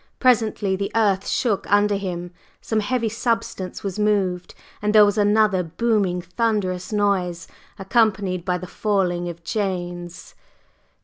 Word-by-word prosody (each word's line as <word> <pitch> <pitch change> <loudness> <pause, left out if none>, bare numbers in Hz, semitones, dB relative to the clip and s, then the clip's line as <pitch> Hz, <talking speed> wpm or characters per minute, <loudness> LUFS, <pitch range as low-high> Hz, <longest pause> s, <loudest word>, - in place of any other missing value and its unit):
Presently 220 -6 +2
the 200 +1 -3
earth 200 -4 +2
shook 210 -6 -1
under 205 0 +4
him, 175 -3 -4 0.3
some 220 - -1
heavy 230 +2 0
substance 230 -4 -2
was 195 0 -4
moved, 195 -4 0 0.3
and 210 +1 0
there 210 -1 +9
was 205 0 +1
another 210 -2 +3
booming 185 0 0
thunderous 185 -2 -1
noise, 190 -5 0 0.3
accompanied 195 -4 +1
by 180 -1 0
the 185 - -7
falling 180 -4 -1
of 170 0 -9
chains. 175 -3 -4
200 Hz, 130 wpm, -22 LUFS, 180-215 Hz, 0.3 s, there